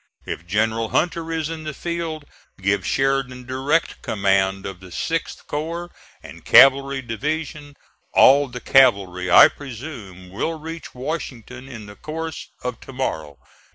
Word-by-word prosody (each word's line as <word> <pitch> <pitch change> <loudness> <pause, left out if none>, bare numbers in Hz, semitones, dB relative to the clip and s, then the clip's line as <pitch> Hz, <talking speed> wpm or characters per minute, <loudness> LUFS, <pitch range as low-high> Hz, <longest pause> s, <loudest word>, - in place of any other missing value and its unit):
If 85 - -6
General 110 +3 0
Hunter 165 -1 0
is 160 -2 -1
in 160 -1 -6
the 155 -2 -5
field, 165 -2 -4 0.3
give 100 0 0
Sheridan 135 -2 0
direct 135 +6 -1
command 95 -1 +1
of 95 -2 -6
the 95 - -12
6th 165 - -3
corps 170 +4 -4 0.3
and - - -12
cavalry 135 0 +6
division. 145 +4 -4 0.4
All 140 +2 +6
the 125 -1 -8
cavalry, 100 -9 +3
I - - +9
presume, 115 - -9
will 160 - -2
reach 160 0 -8
Washington 130 -2 -6
in 115 -5 -9
the 105 0 -12
course 160 +3 -6 0.2
of 125 -1 -4
to - - -11
morrow. 80 - -4
130 Hz, 140 wpm, -22 LUFS, 105-155 Hz, 0.4 s, I